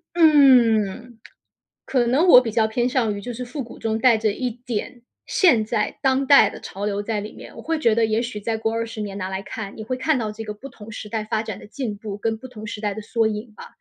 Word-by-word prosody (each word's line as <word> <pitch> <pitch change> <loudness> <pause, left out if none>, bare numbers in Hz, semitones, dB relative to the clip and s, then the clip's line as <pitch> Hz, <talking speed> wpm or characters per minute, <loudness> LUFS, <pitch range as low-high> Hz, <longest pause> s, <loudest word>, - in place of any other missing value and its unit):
嗯， 245 - +4 0.7
可 250 -3 +1
能 275 +9 +3
我 250 - +10
比 240 -3 -3
较 220 0 +3
偏 240 +3 0
向 245 -5 0
于 200 - -6
就 245 +3 -6
是 250 +2 -6
复 260 +3 -5
古 235 - -12
中 220 0 -1
带 240 0 +5
着 215 -1 0
一 250 +3 -2
点 240 0 -6 0.2
现 260 - +4
在 215 0 -2
当 265 0 +1
代 280 +1 +7
的 - - -9
潮 200 +2 -6
流 205 0 -1
在 210 0 -2
里 210 - -8
面。 - - -12
我 - - -9
会 325 -1 -1
觉 230 -8 +3
得 225 -1 +2
也 220 +2 0
许 235 -3 -5
再 225 +2 -2
过 225 0 -2
20 230 -1 -4
年 205 -1 -5
拿 185 - -3
来 190 0 -4
看， 200 -1 -7
你 220 - -7
会 255 +3 -3
看 265 +2 +1
到 215 -2 -3
这 225 +1 -7
个 210 - -6
不 260 +7 -10
同 220 -3 -12
时 220 -1 -7
代 220 0 -3
发 220 0 -1
展 215 -3 -6
的 - - -12
进 220 -2 -5
步， 205 -2 -6
跟 220 +1 -2
不 260 +3 -10
同 220 -3 -9
时 210 0 -6
代 205 -2 -2
的 215 - -7
缩 225 +1 0
影 215 +1 -4
吧。 - - -10
225 Hz, 280 characters per minute, -22 LUFS, 215-250 Hz, 0.7 s, 我